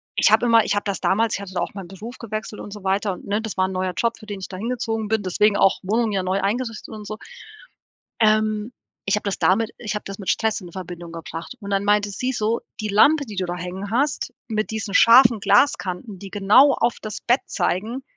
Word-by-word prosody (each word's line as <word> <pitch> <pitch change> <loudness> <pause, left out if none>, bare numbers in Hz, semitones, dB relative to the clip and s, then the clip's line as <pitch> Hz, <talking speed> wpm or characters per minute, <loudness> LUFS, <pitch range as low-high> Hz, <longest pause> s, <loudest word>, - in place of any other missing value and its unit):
ich - - +4
habe - - +5
immer 230 -1 +6
ich - - 0
habe 205 - 0
das 200 -2 -2
damals 220 +3 +2
ich - - -5
hatte 195 -2 -9
da - - 0
auch - - -3
meinen 195 -3 -7
Beruf 220 +6 -9
gewechselt 215 -1 -6
und 205 - -9
so 210 -2 -10
weiter 195 +2 +1
und 180 - -11
ne, 205 +2 0
das 220 -3 -6
war 185 0 +2
ein - - -5
neuer 185 0 -2
Job, 235 0 0
für 215 - -14
den 205 -2 -5
ich 190 - -6
dahin 200 +5 -5
gezogen 225 -3 -2
bin, 220 -1 +1
deswegen 200 +3 +2
auch 195 -1 +3
Wohnung 220 +3 +1
ja 190 -2 0
neu 190 +2 0
eingerichtet 230 +3 -2
und 210 -1 -8
so. 215 - -5 1.0
Ähm, 215 +1 +2 0.3
ich 195 - +2
habe 210 - -3
das 200 -2 -2
damit 200 +7 +2
Ich 215 -2 -4
habe 210 - -4
das 195 +1 -7
mit 195 - -4
Stress 220 -1 0
in 175 -2 -10
Verbindung 175 -2 -8
gebracht 165 +5 -7
und 200 0 -6
dann 195 0 +1
meinte 205 0 +2
sie 255 +6 -2
so: 225 -1 0 0.2
„Die 215 - -3
Lampe, 285 +9 +4
die 215 -4 -9
du 185 - 0
da 175 0 -4
hängen 180 +3 -6
hast, 280 +6 0 0.2
mit 215 -1 -1
diesen 220 -2 -4
scharfen 235 0 +7
Glaskanten, 195 -7 +1
die 195 - -9
genau 215 +8 +5
auf 235 0 0
das 215 -1 -6
Bett 245 +3 +2
zeigen, 225 +9 -2
210 Hz, 240 wpm, -22 LUFS, 195-225 Hz, 1.0 s, scharfen